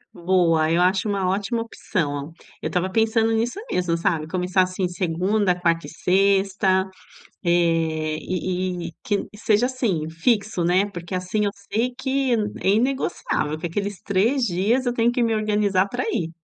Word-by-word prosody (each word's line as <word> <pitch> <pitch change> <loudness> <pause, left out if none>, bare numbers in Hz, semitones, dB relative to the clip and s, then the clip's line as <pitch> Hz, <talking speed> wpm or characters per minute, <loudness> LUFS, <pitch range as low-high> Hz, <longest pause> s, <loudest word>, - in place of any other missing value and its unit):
Boa, 170 -3 +2
eu 170 - +3
acho 190 +3 +2
uma 195 -2 0
ótima 205 +4 -1
opção. 150 -9 -3 0.3
Eu - - -2
estava 180 +1 0
pensando 225 +2 +2
nisso 240 - -1
mesmo, 175 -2 0
sabe. 160 -2 0
Começar, 180 +1 +1
assim, 185 0 0
segunda, 180 +2 0
quarta 170 -2 +1
e - - -8
sexta. 190 +1 +2 0.6
Eh, 165 -3 +1
e 180 -1 -2
e - - -15
quin 205 -2 -1
seja 215 +2 +2
assim 210 -12 -1
fixo, 200 +2 0
né, 180 +4 +3
porque 175 0 -6
assim 185 +4 -1
eu 200 - 0 0.2
sei 245 +3 0
que 265 -1 0 0.3
é - - -1
inegociável 215 - 0
que 160 - -6
aqueles 200 +3 -3
3 225 +7 +1
dias 215 +8 +1
eu 245 - +1
tenho 235 0 +2
que 245 -1 +1
me 225 -1 +1
organizar 210 -3 +1
pra 250 +1 -2
ir. 170 -7 -1
190 Hz, 160 wpm, -23 LUFS, 175-220 Hz, 0.6 s, eu